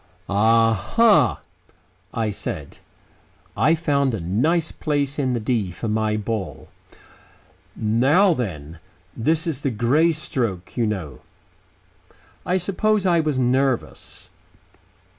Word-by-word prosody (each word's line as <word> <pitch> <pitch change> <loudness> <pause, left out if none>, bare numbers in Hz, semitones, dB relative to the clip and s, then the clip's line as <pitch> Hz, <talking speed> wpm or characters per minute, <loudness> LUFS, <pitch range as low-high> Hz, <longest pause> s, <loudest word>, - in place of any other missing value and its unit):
"A 115 +3 +3
ha!" 215 - +3 0.7
I 110 -2 -2
said. - - -6 0.8
I 160 - +3
found 140 -6 0
a - - -5
nice 150 - 0
place 145 -2 -2
in 130 -3 0
the 120 - -1
"D" 110 -3 -1
for 90 +6 -6
my 110 0 0
ball. 105 -2 -5 1.1
"Now 135 - +3
then. 85 - -5 0.4
This 160 +8 0
is 155 -5 -3
the 135 - 0
Grey 130 +9 +2
stroke, 120 - -3
you 120 -3 +1
know." 85 -11 -5 1.3
I 180 - +2
suppose 200 +3 0
I 175 -2 +3
was 155 -4 0
nervous. 130 0 -1
125 Hz, 115 wpm, -22 LUFS, 105-155 Hz, 1.3 s, A